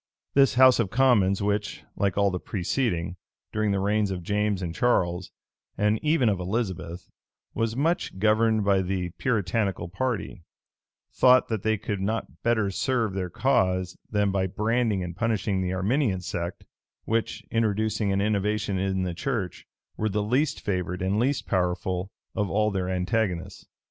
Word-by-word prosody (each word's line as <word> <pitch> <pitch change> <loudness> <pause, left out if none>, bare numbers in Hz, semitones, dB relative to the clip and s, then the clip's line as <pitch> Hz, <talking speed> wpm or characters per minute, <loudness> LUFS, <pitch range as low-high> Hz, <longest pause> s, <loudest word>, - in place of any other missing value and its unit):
This 135 -1 +4
house 130 0 +7
of 110 -5 +1
commons, 105 -6 +3
which, 105 0 -1
like 100 -2 0
all 100 -1 +3
the 90 - -2
preceding, 90 -3 -2 0.4
during 110 0 +1
the 100 -1 +1
reigns 105 +1 +1
of 90 -2 -4
James 105 0 0
and 85 -2 -3
Charles, 90 -5 +1 0.5
and 105 +1 +2
even 150 -5 +2
of 100 -3 +1
Elizabeth, 95 -3 -3 0.5
was 115 0 -1
much 155 - 0
governed 110 +1 +3
by 100 -1 +3
the 90 -1 -2
Puritanical 100 -6 0
party, 105 -1 -3 0.7
thought 130 0 +5
that 110 -4 -1
they 110 +1 +1
could 100 0 -4
not 110 +4 -3
better 110 -4 +1
serve 115 0 0
their 95 -2 -3
cause 95 -5 +1
than 105 -2 +1
by 95 -1 0
branding 105 0 0
and 85 -1 -6
punishing 105 -2 0
the 90 0 -1
Arminian 100 +1 +1
sect, 85 0 -5 0.4
which, 115 0 -1
introducing 110 -2 +1
an 95 0 +1
innovation 105 -1 0
in 95 0 0
the 90 -1 -2
church, 95 -2 -3 0.3
were 110 - 0
the 105 +1 -1
least 135 +7 0
favored 90 -2 -2
and 95 +3 +1
least 135 +4 0
powerful 90 +1 -1 0.2
of 105 -3 -1
all 105 +1 +1
their 95 -2 -2
antagonists. 95 -1 -2
100 Hz, 155 wpm, -26 LUFS, 95-115 Hz, 0.7 s, house